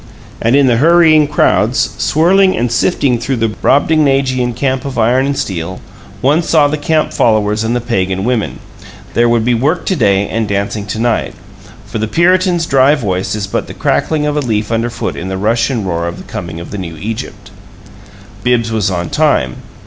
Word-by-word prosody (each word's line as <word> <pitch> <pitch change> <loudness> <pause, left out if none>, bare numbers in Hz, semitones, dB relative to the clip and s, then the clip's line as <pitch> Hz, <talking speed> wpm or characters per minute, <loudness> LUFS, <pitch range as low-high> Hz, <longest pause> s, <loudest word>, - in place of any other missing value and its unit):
And 115 +3 +2
in 140 -1 +4
the 120 -3 +3
hurrying 160 +1 +5
crowds, - - +1
swirling 185 +4 +3
and 120 0 -1
sifting 125 -1 +1
through 130 +3 -2
the 115 -1 0
brobdingnagian 135 -1 +1
camp 130 0 -1
of 135 -2 -6
iron 125 +4 +2
and 140 0 -2
steel, 90 -1 -4 0.4
one 145 +6 +3
saw 155 -3 +3
the 145 - -1
camp 155 +1 0
followers 110 -1 +1
and 115 +2 -1
the 120 - -1
pagan 95 -5 -1
women 120 -1 -1 0.6
there 120 0 +3
would 115 -1 +1
be 125 - +2
work 145 +9 0
to 190 - 0
day 100 - +2
and 110 -1 -2
dancing 100 +1 -3
to 105 - -4
night. 115 0 -1 0.5
For 110 +2 -5
the 110 - -1
Puritan's 175 - +2
dry 135 0 +4
voice 95 -7 -2
is 105 -2 -3
but 100 - -3
the - - -9
crackling 155 -2 0
of 150 0 -1
a - - +1
leaf 110 -4 -2
underfoot 115 +1 -2
in 90 - -6
the 95 0 -3
rush 110 +6 +1
and 115 -7 -2
roar 85 -1 -2
of 85 - -5
the - - -10
coming 85 -2 -7
of 85 - -9
the 105 - -5
new 85 -3 -7
Egypt. 105 +1 -7 0.9
Bibbs 120 -2 +1
was 110 -4 0
on 90 -2 -3
time. 145 - +1
120 Hz, 195 wpm, -14 LUFS, 105-145 Hz, 0.9 s, hurrying